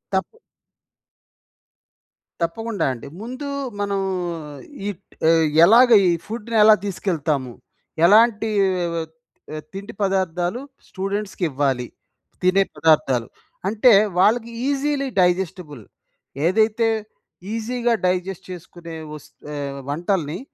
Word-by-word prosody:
తప్పు. 190 - -2 2.0
తప్పకుండా! 200 +3 -2
అండి. 120 +2 -10
ముందూ 255 +5 -6 0.3
మనం 200 -1 -1 0.9
ఈక్ 200 -2 -6 0.3
ఏహ్! 165 -1 +4 0.2
ఎలాగ, 240 +6 +6 0.2
ఈ - - +4 0.2
ఫుడ్‌నేలా 220 -1 +4
తీసుకెళ్తాము? 155 -9 -2 0.5
ఎలాంటీ 220 +3 +5 0.5
వెవత్ 160 -1 -5 0.4
ఆహ్, 155 - -6
తిండి 195 +1 -8
పదార్థాలు 190 +1 0 0.3
స్టూడెంట్స్‌కివ్వాలి? 175 -10 -2 0.6
తినే 185 +2 +4
పదార్థాలు. 135 -7 +2 0.4
అంటే 220 +4 +5 0.3
వాళ్ళకి 230 +4 +3 0.2
ఈజీలీ 280 0 0
డైజెస్టిబుల్. 180 - 0 0.6
ఏదైతే, 220 +5 +2 0.7
ఈజీగా, 235 +1 -1
డైజెస్ట్ 185 +1 -1
చేసుకునే 175 -2 -10 0.2
వస్ 150 - -10 0.3
ఆహ్, 140 -1 -5
వంటల్ని 170 +1 -1
190 Hz, 90 wpm, -22 LUFS, 165-220 Hz, 2.0 s, ఎలాగ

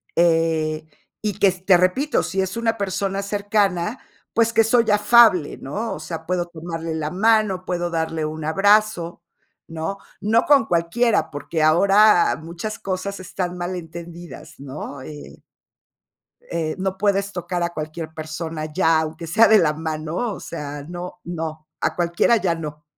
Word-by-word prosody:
eh, 160 -2 +1 0.3
y 210 -2 -1
que 200 - +4
s 185 -1 -2
te 190 - +6
repito, 185 +12 +2
sí 190 - -3
es 190 +3 -3
una 230 -1 0
persona 195 0 -2
cercana, 205 0 0 0.3
pues, 230 0 +2
que 225 - +5
soy 225 0 +3
afable, 210 -5 +5
¿no? 210 +12 -4
O - - -8
sea, 160 +1 -7
puedo 180 -1 0
tomarle 165 -1 -6
la 155 -1 -2
mano, 200 -1 +2
puedo 175 -1 -2
darle 160 -1 -2
un 155 0 -4
abrazo, 195 -1 +2 0.4
¿no? 165 +4 -4 0.2
No 220 +3 +3
con 280 -6 +5
cualquiera, 175 +3 +1
porque 155 +2 -2
ahora 195 +4 +5
muchas 170 +7 -6
cosas 195 +1 -4
están 180 -1 -4
mal 175 +1 -3
entendidas, 170 -1 -9
¿no? 140 0 -7
Eh, 150 +2 -10 1.1
eh, 160 -2 -2
no 190 0 -2
puedes 200 0 +1
tocar 175 -1 -3
a 170 - 0
cualquier 155 0 -6
persona 155 0 -5
ya, 165 -3 +3
aunque 160 +1 -4
sea 220 +7 +5
de 215 0 +6
la 150 -2 +2
mano, 155 +1 -4 0.2
o - - -8
sea, 145 -3 -6
no 180 +1 -7
no, 160 -2 -5
a - - -1
cualquiera 175 +6 +2
ya 190 -6 +1
no. 150 -2 -7
175 Hz, 155 wpm, -22 LUFS, 160-200 Hz, 1.1 s, te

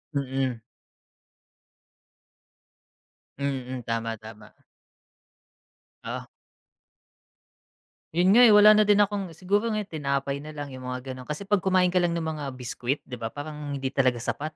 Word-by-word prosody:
Mm. 135 -3 -1 2.8
Mm, 130 -3 -3
tama, 115 -1 -2
tama. 110 0 -13 1.5
Oh. - - -5 1.9
'Yun 180 +2 +4
nga, 235 +4 +7
eh, 215 - +7
wala 210 +1 +9
na 215 0 +6
din 205 0 +6
akong 200 -1 -2
siguro 200 +7 0
ngayo 215 -2 -1
tinapay 140 -5 -2
na 150 +1 -9
lang, 145 -1 -6
'yong 130 -1 -8
mga 125 +1 -5
gano'n 130 -1 -9
kasi 150 +6 -4
'pag 205 0 +2
kumain 185 -1 +2
ka 180 - +3
lang 175 -1 +1
ng 170 - -2
mga 155 -2 -4
biscuit, 125 +2 -3
'di 125 -2 -8
ba, 115 - -3
parang 145 +2 -6
hindi 135 -1 -3
talaga 130 -3 +2
sapat, 145 +6 -4
145 Hz, 140 wpm, -26 LUFS, 130-180 Hz, 2.8 s, wala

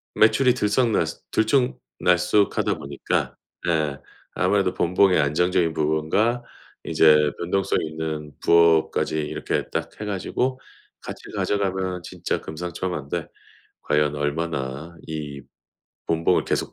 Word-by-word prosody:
매출이 125 +3 +5
들썩날쓰 110 0 +1
들쭉날쭉 105 - +1
하다 - - +1
보니까 70 0 -2 0.3
예. 80 -4 +1 0.4
아무래도 100 -3 +1
본봉의 90 +2 +3
안정적인 85 +3 +1
부분과 80 +11 +1 0.4
이제 75 -2 +4
변동성 95 +2 0
있는 80 -1 -4
부업까지 85 -2 +3
이렇게 75 -1 -2
딱 - - -3
해 - - -3
가지고 125 +6 -2 0.4
같이 - - -8
가져가면 95 -3 -1
진짜 - - -3
금상첨환데 85 -1 -4 0.6
과연 75 0 +1
얼마나 75 0 -3
이 75 -3 -6 0.6
본봉을 80 0 +2
계속 - - -1
85 Hz, 265 characters per minute, -23 LUFS, 75-95 Hz, 0.6 s, 매출이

